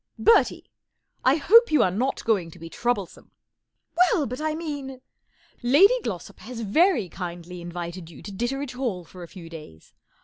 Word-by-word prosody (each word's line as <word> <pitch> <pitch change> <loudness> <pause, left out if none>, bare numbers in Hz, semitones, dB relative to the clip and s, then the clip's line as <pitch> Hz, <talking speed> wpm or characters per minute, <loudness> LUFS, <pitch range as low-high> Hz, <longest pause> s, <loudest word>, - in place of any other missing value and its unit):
" - - -52
Bertie! 455 - +3 0.6
X 280 +3 +2
hope 465 +2 +7
you 295 -6 +5
are 185 - +2
not 250 +8 -2
going 195 -7 +1
to - - -14
be 165 0 -10
trou 245 +1 +1
blesome," 195 -4 -10 0.4
" 320 - -52
Well, 345 -3 +3
but 250 +4 -5
I 310 0 -1
mean 285 -5 -5 0.2
" - - -40
" - - -34
Lady 290 - +6
GIossop 185 - -6
has 235 0 -8
very 240 - +3
kindly 175 0 -7
invited 175 0 -7
you 155 - -13
to 205 - -7
Ditteredge 245 +6 -3
Hall 240 -9 -3
for 180 - -13
a 170 - -8
few 175 -2 -11
days. 155 - -12
230 Hz, 195 wpm, -25 LUFS, 175-285 Hz, 0.6 s, hope